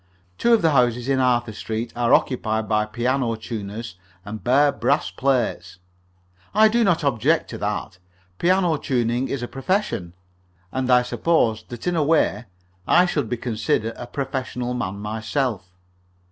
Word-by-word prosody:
Two 235 Hz, -, +3 dB
of 230 Hz, -5 st, +4 dB
the 160 Hz, -, +4 dB
houses 125 Hz, -2 st, +2 dB
in 135 Hz, -1 st, +2 dB
Arthur 120 Hz, -3 st, +1 dB
Street 110 Hz, +2 st, -4 dB
are 120 Hz, -1 st, +1 dB
occupied 110 Hz, -4 st, +1 dB
by 105 Hz, 0 st, +1 dB
piano 120 Hz, +2 st, 0 dB
tuners, 110 Hz, -2 st, -6 dB, 0.3 s
and 110 Hz, +1 st, -7 dB
bear 140 Hz, +4 st, +4 dB
brass 140 Hz, +1 st, 0 dB
plates. 120 Hz, -9 st, -1 dB, 0.8 s
I 215 Hz, +1 st, +6 dB
do 235 Hz, +2 st, +2 dB
not 175 Hz, -6 st, +2 dB
object 140 Hz, +4 st, +1 dB
to 115 Hz, -, -6 dB
that. 100 Hz, -2 st, -3 dB, 0.4 s
Piano 180 Hz, -2 st, +2 dB
tuning 125 Hz, -2 st, 0 dB
is 135 Hz, -3 st, -3 dB
a -, -, -3 dB
profession, 135 Hz, -, -2 dB, 0.6 s
and 130 Hz, -1 st, -2 dB
I 125 Hz, -1 st, +5 dB
suppose 125 Hz, -5 st, +1 dB
that, 120 Hz, -2 st, -8 dB
in 175 Hz, -1 st, 0 dB
a 160 Hz, -, +2 dB
way, 145 Hz, -8 st, +2 dB, 0.4 s
I 180 Hz, -, +5 dB
should 145 Hz, -10 st, -1 dB
be 120 Hz, -, -1 dB
considered 110 Hz, -1 st, -1 dB
a 120 Hz, -, -8 dB
professional 125 Hz, -2 st, -3 dB
man 100 Hz, -6 st, -3 dB
myself. 110 Hz, 0 st, -2 dB
125 Hz, 155 wpm, -23 LUFS, 110-140 Hz, 0.8 s, I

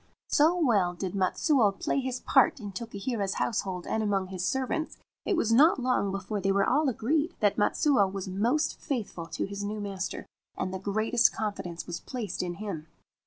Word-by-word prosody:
So 320 Hz, +5 st, +4 dB
well 205 Hz, -, +2 dB
did 185 Hz, 0 st, -4 dB
Matsuo 200 Hz, -, +2 dB
play -, -, 0 dB
his 255 Hz, -1 st, -3 dB
part 305 Hz, -, +4 dB
in 205 Hz, -3 st, -6 dB
Tokihira's 200 Hz, 0 st, -3 dB
house 225 Hz, -, 0 dB
hold 185 Hz, -2 st, -5 dB
and 220 Hz, -, -1 dB
among 195 Hz, -3 st, 0 dB
his 185 Hz, -2 st, -4 dB
servants, 265 Hz, +9 st, -1 dB, 0.3 s
it 390 Hz, -, +1 dB
was 230 Hz, -8 st, +2 dB
not 300 Hz, +8 st, +6 dB
long 250 Hz, -6 st, +1 dB
before 195 Hz, +1 st, -3 dB
they 195 Hz, +1 st, +2 dB
were 195 Hz, 0 st, +2 dB
all 295 Hz, +2 st, +3 dB
agreed 295 Hz, -, 0 dB
that 205 Hz, -2 st, +3 dB
Matsuo 205 Hz, -2 st, +3 dB
was 195 Hz, -1 st, -5 dB
most 230 Hz, +11 st, 0 dB
faithful 210 Hz, -, -4 dB
to 165 Hz, -, -3 dB
his 200 Hz, +1 st, -5 dB
new 210 Hz, +1 st, -3 dB
master, 195 Hz, -2 st, -4 dB, 0.3 s
and 185 Hz, 0 st, -2 dB
the 190 Hz, -, -3 dB
greatest 215 Hz, +4 st, +2 dB
confidence 190 Hz, -6 st, -4 dB
was 175 Hz, -1 st, -5 dB
placed 230 Hz, -8 st, -4 dB
in 175 Hz, -1 st, -3 dB
him. 175 Hz, -6 st, -6 dB
205 Hz, 185 wpm, -28 LUFS, 190-250 Hz, 0.3 s, not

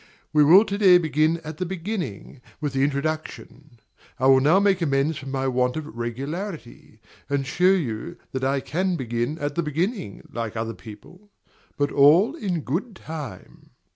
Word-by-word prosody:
We 150 Hz, -1 st, +6 dB
will 185 Hz, +9 st, +7 dB
to 200 Hz, -1 st, -3 dB
day 185 Hz, -4 st, +7 dB
begin 160 Hz, -1 st, +1 dB
at 155 Hz, -1 st, -7 dB
the 185 Hz, -, -2 dB
beginning, 170 Hz, -, -5 dB, 0.2 s
with 145 Hz, -3 st, -3 dB
the 135 Hz, 0 st, +1 dB
introduction. 145 Hz, -2 st, -4 dB, 0.4 s
I 130 Hz, -, -1 dB
will 135 Hz, 0 st, +7 dB
now 155 Hz, +8 st, +4 dB
make 200 Hz, -2 st, +2 dB
amends 145 Hz, 0 st, +1 dB
for 135 Hz, -, -10 dB
my 135 Hz, 0 st, -2 dB
want 125 Hz, +1 st, 0 dB
of 155 Hz, -, -4 dB
regularity, 135 Hz, -, -6 dB, 0.3 s
and 140 Hz, -1 st, 0 dB
show 180 Hz, +6 st, 0 dB
you 120 Hz, -, -3 dB
that 130 Hz, 0 st, -4 dB
I 135 Hz, +1 st, +1 dB
can 185 Hz, +6 st, -1 dB
begin 120 Hz, +1 st, -2 dB
at 145 Hz, -2 st, -3 dB
the 170 Hz, -, 0 dB
beginning, 165 Hz, -, -3 dB
like 115 Hz, -1 st, -4 dB
other 115 Hz, 0 st, -3 dB
people; 175 Hz, -, -14 dB, 0.5 s
but 145 Hz, 0 st, 0 dB
all 170 Hz, -, +5 dB
in 185 Hz, -, -2 dB
good 185 Hz, -, -3 dB
time. 150 Hz, -, -9 dB
150 Hz, 170 wpm, -24 LUFS, 130-175 Hz, 0.5 s, will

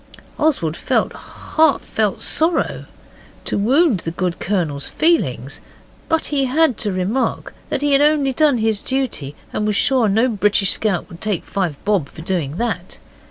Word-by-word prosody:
Oswald 260 Hz, -, +1 dB
felt -, -, 0 dB
heart 320 Hz, 0 st, 0 dB
felt -, -, -1 dB
sorry 320 Hz, +1 st, 0 dB, 0.6 s
to -, -, -2 dB
wound 255 Hz, -, +3 dB
the 165 Hz, -, -4 dB
good 175 Hz, +1 st, -3 dB
Colonel's 165 Hz, -8 st, -1 dB
feelings, 140 Hz, -, +1 dB, 0.5 s
but 325 Hz, -1 st, +1 dB
he 275 Hz, -2 st, +2 dB
had 275 Hz, 0 st, +2 dB
to 210 Hz, -, 0 dB
remark 190 Hz, +8 st, -1 dB, 0.2 s
that 280 Hz, -, -2 dB
he 290 Hz, -, +2 dB
had 275 Hz, -, +5 dB
only 295 Hz, -2 st, +3 dB
done 295 Hz, -2 st, +3 dB
his 220 Hz, -2 st, +1 dB
duty, 255 Hz, -, -2 dB, 0.2 s
and -, -, -1 dB
he -, -, 0 dB
was 210 Hz, -, +1 dB
sure 250 Hz, -1 st, +3 dB
no 220 Hz, +5 st, +3 dB
British 205 Hz, -3 st, +2 dB
scout 205 Hz, -5 st, 0 dB
would 170 Hz, 0 st, -13 dB
take 210 Hz, -5 st, -1 dB
five 180 Hz, -7 st, -2 dB
bob 195 Hz, -9 st, +1 dB
for 160 Hz, -, -11 dB
doing 165 Hz, -6 st, -2 dB
that. 235 Hz, +1 st, -3 dB
215 Hz, 165 wpm, -19 LUFS, 180-275 Hz, 0.6 s, had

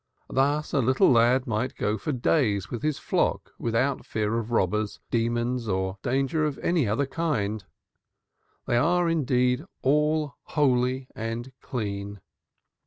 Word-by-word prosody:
Thus 145 Hz, +3 st, +1 dB
a -, -, +3 dB
little 130 Hz, +2 st, +4 dB
lad 125 Hz, +2 st, +4 dB
might 120 Hz, +1 st, -2 dB
go 105 Hz, -, 0 dB
for 110 Hz, +8 st, -3 dB
days 120 Hz, -, +1 dB
with 120 Hz, -, -4 dB
his 150 Hz, -2 st, 0 dB
flock -, -, -1 dB
without 120 Hz, +4 st, 0 dB
fear 110 Hz, +1 st, -1 dB
of 115 Hz, 0 st, -5 dB
robbers, 105 Hz, -1 st, 0 dB
demons 120 Hz, +1 st, 0 dB
or 95 Hz, 0 st, -1 dB
danger 135 Hz, +4 st, 0 dB
of 150 Hz, -2 st, -1 dB
any 165 Hz, -8 st, +2 dB
other 110 Hz, +7 st, +1 dB
kind; 115 Hz, -9 st, -2 dB, 1.0 s
they 120 Hz, -, +1 dB
are, 175 Hz, +6 st, +3 dB
indeed, 125 Hz, -4 st, +1 dB, 0.2 s
all 150 Hz, +1 st, +2 dB
holy 130 Hz, -2 st, +1 dB
and 115 Hz, +3 st, -4 dB
clean. 100 Hz, -4 st, -4 dB
125 Hz, 135 wpm, -26 LUFS, 110-140 Hz, 1.0 s, little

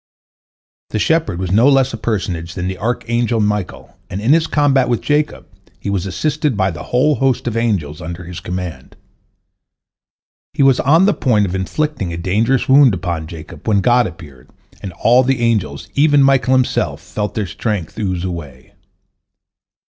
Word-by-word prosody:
" -, -, -91 dB
The -, -, -2 dB
shepherd 160 Hz, -, +1 dB
was 90 Hz, -1 st, -3 dB
no 115 Hz, +8 st, +5 dB
less 135 Hz, -2 st, +3 dB
a -, -, -2 dB
personage 90 Hz, -7 st, -3 dB
than 90 Hz, 0 st, -3 dB
the 95 Hz, 0 st, -5 dB
archangel 120 Hz, +1 st, -1 dB
Michael, 105 Hz, -3 st, -3 dB
and 95 Hz, -, -4 dB
in 115 Hz, +7 st, +3 dB
his 165 Hz, 0 st, +2 dB
combat 135 Hz, -4 st, +2 dB
with 120 Hz, -, +1 dB
Jacob 150 Hz, 0 st, -1 dB, 0.3 s
he 100 Hz, -, -4 dB
was 100 Hz, -1 st, -2 dB
assisted 150 Hz, -, -1 dB
by 95 Hz, -1 st, +1 dB
the 85 Hz, -, -8 dB
whole 130 Hz, +5 st, +2 dB
host 135 Hz, -2 st, 0 dB
of 120 Hz, -2 st, -2 dB
angels 100 Hz, -11 st, -1 dB
under 85 Hz, +2 st, -7 dB
his 90 Hz, 0 st, -8 dB
command. 90 Hz, -7 st, -6 dB, 1.6 s
He -, -, +1 dB
was 135 Hz, -2 st, +4 dB
on 165 Hz, +7 st, +4 dB
the 205 Hz, -, +3 dB
point 110 Hz, -5 st, +1 dB
of 90 Hz, -, -4 dB
inflicting 100 Hz, -, -2 dB
a 85 Hz, -, -5 dB
dangerous 110 Hz, +9 st, 0 dB
wound 135 Hz, -5 st, +6 dB
upon 85 Hz, -3 st, -4 dB
Jacob, 80 Hz, +5 st, -11 dB
when 100 Hz, -3 st, +3 dB
God 120 Hz, +3 st, +3 dB
appeared, 70 Hz, -8 st, -13 dB, 0.3 s
and 95 Hz, -, -6 dB
all 120 Hz, +7 st, +4 dB
the 130 Hz, 0 st, 0 dB
angels, 105 Hz, -12 st, -1 dB
even 145 Hz, -1 st, +4 dB
Michael 130 Hz, -1 st, +3 dB
himself, 130 Hz, -1 st, 0 dB
felt 105 Hz, -1 st, -5 dB
their 105 Hz, -, -1 dB
strength 100 Hz, +1 st, -4 dB
ooze 95 Hz, -4 st, -2 dB
away. 75 Hz, -9 st, -7 dB
110 Hz, 170 wpm, -17 LUFS, 90-130 Hz, 1.6 s, wound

